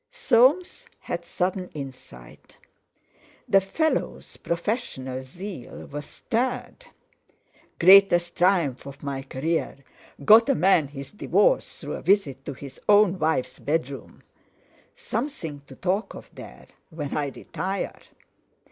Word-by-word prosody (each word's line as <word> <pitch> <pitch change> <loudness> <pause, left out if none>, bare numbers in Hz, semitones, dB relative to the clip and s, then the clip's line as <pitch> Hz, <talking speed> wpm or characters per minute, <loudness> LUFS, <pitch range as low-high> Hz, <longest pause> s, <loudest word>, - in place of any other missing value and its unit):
Soames 365 - +2
had 170 0 -5
sudden 180 +1 -2
insight. 130 - -11 0.9
The 195 - +5
fellow's 315 +12 -2
professional 170 - -3
zeal 175 +3 -9
was 145 0 -6
stirred: 250 - -3 0.9
"Greatest 175 -2 +6
triumph 170 -8 +1
of 140 +1 -11
my 140 -1 -3
career; 140 +5 -2 0.5
got 225 - +7
a 275 - +4
man 175 -7 +3
his 140 -1 -9
divorce - - +1
through - - -6
a - - -5
visit 150 -10 +1
to - - -4
his 135 0 -11
own 205 -3 +5
wife's 155 -5 -1
bedroom! 140 -3 -3 0.7
Something 190 - -4
to 135 - -12
talk 190 +7 -2
of - - -12
there, - - -12 0.2
when 150 -4 -5
I 145 -1 0
retire!" 190 +7 -4
175 Hz, 115 wpm, -25 LUFS, 140-210 Hz, 0.9 s, got